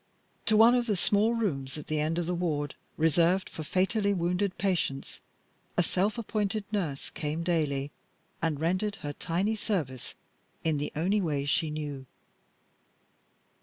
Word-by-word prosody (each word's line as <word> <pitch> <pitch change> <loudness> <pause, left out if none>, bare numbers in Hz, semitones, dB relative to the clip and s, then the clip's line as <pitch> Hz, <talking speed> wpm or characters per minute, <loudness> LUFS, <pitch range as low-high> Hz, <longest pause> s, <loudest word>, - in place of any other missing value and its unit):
To 220 - +5
one 225 +2 +8
of 245 -1 +2
the 210 - +2
small 215 +5 +3
rooms 140 -12 -1
at 150 - -7
the 155 0 -1
end 155 +2 0
of 175 - 0
the 180 - -1
ward 155 -5 -1 0.2
reserved 170 +4 +3
for - - -6
fatally 200 +5 +1
wounded 180 +2 0
patients 165 -8 -1 0.6
a 175 - +5
self 195 +6 +1
appointed 215 -2 -1
nurse 165 -10 -2
came 155 +2 -3
daily, 150 -5 0 0.5
and 160 -3 0
rendered 185 +6 0
her 145 - -2
tiny 185 +8 0
service 155 - -3 0.5
in 155 -3 +1
the 145 - -3
only 190 +7 +2
way 145 -5 0
she 155 +2 +2
knew. 145 -3 -5
170 Hz, 150 wpm, -29 LUFS, 150-200 Hz, 0.6 s, one